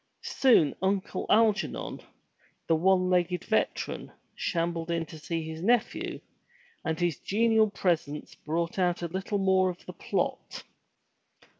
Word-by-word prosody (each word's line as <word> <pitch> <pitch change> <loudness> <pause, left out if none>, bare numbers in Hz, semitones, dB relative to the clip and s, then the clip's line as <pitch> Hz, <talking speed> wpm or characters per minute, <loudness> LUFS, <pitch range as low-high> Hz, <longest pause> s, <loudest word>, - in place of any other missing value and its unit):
Soon 230 - +4
Uncle 190 0 -1
Algernon, 215 -1 +1 0.6
the 165 - +3
one 185 +2 +3
legged 180 0 +1
veteran, - - -1 0.2
shambled 170 -1 -2
in 170 -1 0
to 160 0 -11
see 165 +1 -3
his 160 0 -7
nephew, 235 +4 0 0.6
and 160 +1 -2
his 175 -4 0
genial 220 +1 +3
presence 160 -7 -1
brought 170 +4 -3
out 175 -1 +1
a - - 0
little 195 +2 -2
more 190 -1 +3
of 180 - -8
the - - -8
plot. - - -3
180 Hz, 130 wpm, -28 LUFS, 165-195 Hz, 0.6 s, Soon